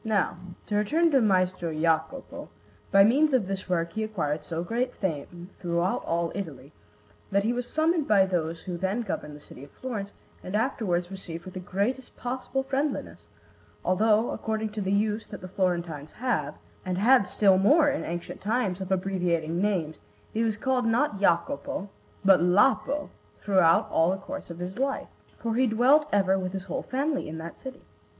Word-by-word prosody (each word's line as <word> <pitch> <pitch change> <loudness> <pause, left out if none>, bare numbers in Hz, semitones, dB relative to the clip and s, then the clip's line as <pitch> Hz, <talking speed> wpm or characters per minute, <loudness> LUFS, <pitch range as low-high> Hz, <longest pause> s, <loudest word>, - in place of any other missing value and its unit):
Now, 215 -5 +1 0.3
to 210 - -2
return 320 +11 +2
to 270 -3 +4
Maestro 185 -4 +1
Jacopo; 160 - -1 0.4
by 195 0 +7
means 280 +8 +4
of 250 -6 +3
this 190 -1 -4
work 170 -2 0
he 220 - -2
acquired 160 -8 -2
so 165 +2 -4
great 245 +6 -2
fame 175 +1 -4
throughout 175 +1 0
all 170 0 0
Italy 145 -8 -6 0.6
that 200 0 +2
he 230 +3 +1
was 245 0 -3
summoned 315 -1 +1
by 200 -3 +5
those 165 -3 -2
who 180 -2 -5
then 190 +6 -1
governed 150 -7 -4
the - - -11
city 140 -2 -13
of 140 - -11
Florence, 210 - -6 0.3
and 185 - -4
afterwards 195 -7 0
received 175 -3 -7
with 185 - -9
the 185 - -5
greatest 200 +8 -2
possible 260 +2 -3
friendliness; 275 +2 -3 0.6
although, 215 +4 +3
according 220 -1 -2
to 210 0 -5
the 190 0 -1
use 210 +2 0
that - - -8
the 185 - -7
Florentines 170 -5 -2
have, 185 - -1 0.3
and 180 -1 -2
had 230 0 +5
still 195 -3 +4
more 290 - +5
in 285 0 0
ancient 170 +1 -5
times, 205 -3 0
of 190 0 -5
abbreviating 180 -3 0
names, 180 -7 0 0.4
he 225 - +1
was 220 -2 0
called 250 0 0
not 230 -2 +1
Jacopo 170 0 0 0.3
but 195 -2 +6
Lapo 265 +10 +2 0.3
throughout 195 +1 +4
all 165 +1 +3
the 190 - 0
course 285 +5 -8
of 170 - -7
his 180 +5 -6
life; 275 0 -1 0.3
for 230 -1 -2
he 255 +3 +3
dwelt 265 +7 +4
ever 195 -1 +3
with 185 0 -4
his 190 -1 -4
whole 190 - -3
family 275 - -2
in 160 - -6
that 165 +1 -7
city. 265 0 -10
195 Hz, 180 wpm, -27 LUFS, 175-240 Hz, 0.6 s, by